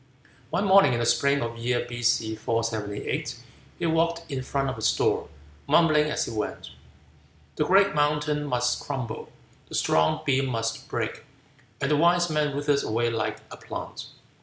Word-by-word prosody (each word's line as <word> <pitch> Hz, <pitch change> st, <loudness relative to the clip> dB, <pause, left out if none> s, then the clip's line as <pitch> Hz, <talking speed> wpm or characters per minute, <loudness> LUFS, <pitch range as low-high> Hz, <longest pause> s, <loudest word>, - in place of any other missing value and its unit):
One 180 Hz, +7 st, 0 dB
morning, 195 Hz, -5 st, +6 dB
in 120 Hz, -, 0 dB
the 120 Hz, -, 0 dB
spring 140 Hz, +3 st, +2 dB
of 115 Hz, 0 st, -3 dB
the 115 Hz, -, -11 dB
year 120 Hz, +1 st, 0 dB
B.C. 120 Hz, -2 st, 0 dB
478, 110 Hz, -2 st, -2 dB, 0.4 s
he -, -, -2 dB
walked 165 Hz, 0 st, 0 dB
in 135 Hz, -1 st, -2 dB
front 135 Hz, +1 st, -1 dB
of 130 Hz, -, -2 dB
his 110 Hz, -1 st, +2 dB
door, -, -, +1 dB, 0.4 s
mumbling 150 Hz, 0 st, +4 dB
as -, -, -1 dB
he -, -, -6 dB
went: 105 Hz, -, -4 dB, 0.8 s
"The 150 Hz, -, +1 dB
great 195 Hz, +1 st, +5 dB
mountain 150 Hz, 0 st, +1 dB
must 125 Hz, -2 st, 0 dB
crumble; 125 Hz, -6 st, -5 dB, 0.4 s
The -, -, -6 dB
strong 80 Hz, 0 st, +2 dB
beam 135 Hz, -1 st, +2 dB
must 115 Hz, -2 st, -3 dB
break; -, -, -3 dB, 0.6 s
And 140 Hz, -, -1 dB
the 150 Hz, -, +4 dB
wise 175 Hz, +1 st, +3 dB
man 150 Hz, -2 st, 0 dB
withers 145 Hz, 0 st, +1 dB
away 115 Hz, +2 st, 0 dB
like 115 Hz, -1 st, -2 dB
a -, -, -8 dB
plant." -, -, -7 dB
135 Hz, 165 wpm, -26 LUFS, 115-150 Hz, 0.8 s, morning